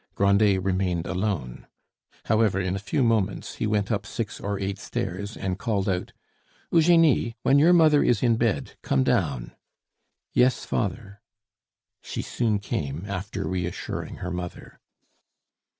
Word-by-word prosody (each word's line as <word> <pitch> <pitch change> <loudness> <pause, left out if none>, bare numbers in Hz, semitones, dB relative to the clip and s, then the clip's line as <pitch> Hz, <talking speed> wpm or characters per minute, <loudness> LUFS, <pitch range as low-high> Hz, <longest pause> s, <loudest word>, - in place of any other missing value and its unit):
Grandet 100 -1 +3
remained 90 -3 0
alone. 95 - -3 0.6
However, 110 -3 +2
in 95 0 -1
a - - -3
few 100 +7 0
moments 110 -4 0
he 110 - -1
went 105 0 0
up 100 -2 -1
six 110 -4 -4
or 100 0 -3
eight 95 0 -3
stairs 100 +4 -4
and 95 0 -3
called 105 -5 -1
out, 90 -2 -1 0.6
"Eugenie, 165 -8 +4
when 140 - +5
your 165 +4 +6
mother 155 -4 +6
is 120 -1 +2
in 120 -2 +4
bed, 115 -3 -1
come 65 -1 +1
down." - - 0 0.8
"Yes, 125 +1 +3
father." 100 -1 -3 0.8
She - - -5
soon 110 -4 0
came, 80 -4 -4
after 100 0 -4
reassuring 90 -2 -4
her 90 - -3
mother. 90 0 -7
100 Hz, 135 wpm, -25 LUFS, 95-115 Hz, 0.8 s, your